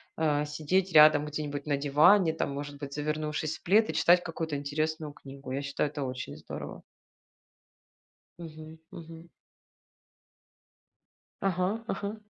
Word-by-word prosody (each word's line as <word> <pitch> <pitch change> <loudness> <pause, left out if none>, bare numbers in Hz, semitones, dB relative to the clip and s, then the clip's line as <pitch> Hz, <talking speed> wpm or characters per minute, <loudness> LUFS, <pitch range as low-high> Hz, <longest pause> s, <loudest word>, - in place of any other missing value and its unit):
а, 150 -2 +1
сидеть 160 +5 -1
рядом 150 -1 +7
где-нибудь 150 -1 -5
на 145 -1 +1
диване, 155 +6 +4
там 150 - -2
может 145 0 -6
быть, 140 -1 -7
завернувшись 150 +1 -2
в - - -30
плед 215 +5 +4
и - - -2
читать 175 +1 +4
какую-то 165 -3 -4
интересную 155 +2 -2
книгу. 135 -2 -11
Я 140 +2 -2
считаю, 140 +1 -2
это 145 -1 -5
очень 130 0 -6
здорово. - - -8 1.6
Мгм 160 -1 -10
мгм. 165 0 -11 2.1
Ага 195 +4 0
ага. 210 +2 -4
155 Hz, 125 wpm, -29 LUFS, 145-165 Hz, 2.1 s, рядом